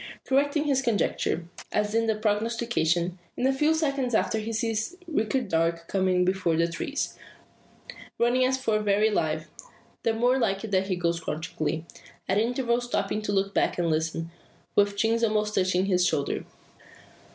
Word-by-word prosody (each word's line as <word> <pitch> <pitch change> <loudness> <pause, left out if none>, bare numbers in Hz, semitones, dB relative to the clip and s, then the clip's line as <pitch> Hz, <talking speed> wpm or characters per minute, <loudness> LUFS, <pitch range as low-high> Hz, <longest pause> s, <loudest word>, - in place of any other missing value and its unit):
Correct 285 +3 +2
in 300 - +1
his 275 -3 +2
conjecture, 205 -7 0 0.2
as 210 0 0
in 230 0 +2
the 220 - +2
prognostication, 210 -5 0 0.2
in 250 - 0
a 270 - +4
few 300 +4 +2
seconds 275 -6 0
after 220 - +1
he 220 +1 -4
sees 225 +7 -1
Richard 255 -5 0
Darke 165 -1 0
coming 185 -2 +2
between 185 -3 +1
the 165 - +3
trees; 170 +12 -4 1.0
running 240 +2 +3
as 260 +1 +2
for 225 -5 +1
very 210 +1 +2
life 155 -4 -1 0.5
the 225 -1 +1
more 245 +3 +3
like 195 -4 0
it 220 - -5
that 190 0 +2
he 190 - 0
goes 170 -1 0
crouchingly; 160 0 -3 0.4
at 195 +2 +2
intervals 240 +1 0
stopping 210 -3 -1
to 210 - -2
look 195 0 0
back - - +1
and 170 -2 +1
listen, 165 +1 -1 0.4
with 205 0 +3
chin 225 +2 +2
almost 215 -1 +1
touching 185 -1 +2
his 180 -2 +2
shoulder! 145 -5 0
210 Hz, 165 wpm, -27 LUFS, 180-235 Hz, 1.0 s, a